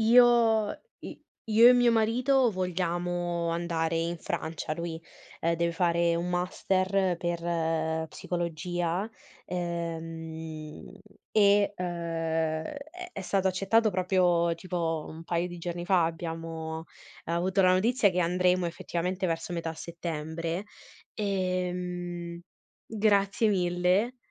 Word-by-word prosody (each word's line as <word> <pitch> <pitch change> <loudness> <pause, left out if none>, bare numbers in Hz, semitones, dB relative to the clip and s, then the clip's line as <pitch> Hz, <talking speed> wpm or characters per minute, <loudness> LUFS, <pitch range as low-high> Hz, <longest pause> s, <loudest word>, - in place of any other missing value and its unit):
io 230 -2 +5 0.3
i - - -9 0.3
io 225 +2 +7
e - - +9
mio 245 -1 +5
marito 240 +3 +3
vogliamo 175 -2 -1
andare 165 -1 -1
in 170 +1 -1
Francia, 160 -1 -3
lui, 170 -1 -5 0.4
ehm, 170 +1 +2
deve 170 0 0
fare 170 0 +2
un 170 +1 -1
master 185 +1 +1
per 165 -2 -1
psicologia, 175 +3 -2 0.4
ehm, 165 -3 -5 0.4
e, 205 -1 +5
uhm, 180 - -3
è 165 - -2 0.4
è - - -4
stato 190 0 +1
accettato 200 +4 +2
proprio 180 -2 +2
tipo 165 -3 -2
un 160 +1 -9
paio 170 +1 -1
di 175 - -8
giorni 175 0 -5
fa, 185 -3 +4
abbiamo 165 -1 -4 0.4
avuto 180 +4 +1
la 185 - +5
notizia 210 +3 +3
che 180 0 0
andremo 180 +1 +2
effettivamente 180 +2 -2
verso 165 +1 -2
metà 165 -1 -3
settembre. 165 +1 -4 0.5
Ehm, 180 -3 -2 0.5
grazie 210 0 +2
mille, 180 +5 +1
175 Hz, 110 wpm, -28 LUFS, 165-190 Hz, 0.5 s, e